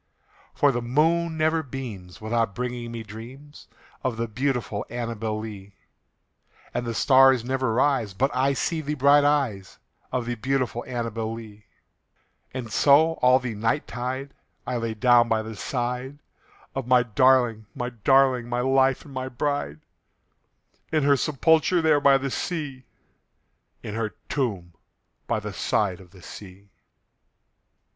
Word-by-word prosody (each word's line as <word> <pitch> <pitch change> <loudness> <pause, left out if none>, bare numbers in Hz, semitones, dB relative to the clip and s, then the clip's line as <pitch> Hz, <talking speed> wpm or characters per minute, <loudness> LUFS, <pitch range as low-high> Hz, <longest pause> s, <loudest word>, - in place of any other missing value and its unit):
For 145 - +4
the 120 -2 -2
moon 160 +6 +1
never 160 +1 +2
beams 120 - -8
without 110 -2 -1
bringing 120 -1 -4
me 115 -1 -6
dreams 125 +8 -12 0.4
Of 125 -3 -1
the 115 +1 -2
beautiful 125 -3 -2
ANNABEL 115 -2 -3
LEE; 100 -3 -9 1.0
And 120 - -2
the 115 - -3
stars 130 -2 +5
never 130 -2 0
rise 120 -5 +1
but 135 +6 0
I 135 +2 +2
see 160 +4 -1
the 150 0 -3
bright 140 +1 +5
eyes 135 -10 0 0.3
Of 125 -2 -1
the 120 - -2
beautiful 125 0 -1
ANNABEL 115 -3 -3
LEE; 110 -2 -11 0.9
And 125 -4 -6
so, 150 +3 +5
all 125 +1 +6
the 125 -3 -4
night 110 +2 -1
tide, 130 +3 -4 0.3
I 125 0 -2
lie 115 -1 -2
down 120 +1 +4
by 110 -1 +1
the 110 0 -7
side 125 +4 -3 0.6
Of 135 -2 -4
my 125 -1 +5
darling, 120 -2 +3
my 125 0 -3
darling, 125 +1 +3
my 120 0 0
life 135 +1 +2
and 140 - -12
my 130 0 -4
bride, 125 - -2 1.1
In 155 -2 +2
her 140 0 +5
sepulchre 160 +5 +2
there 155 -2 +4
by 140 -1 +6
the 135 0 -4
sea 145 -7 -4 1.0
In 105 - -6
her 110 -1 -3
tomb 100 - -2 0.5
by - - 0
the - - -6
side 95 -4 0
of 90 - -16
the 95 -1 -17
sea. 100 0 -12
125 Hz, 145 wpm, -25 LUFS, 110-135 Hz, 1.1 s, all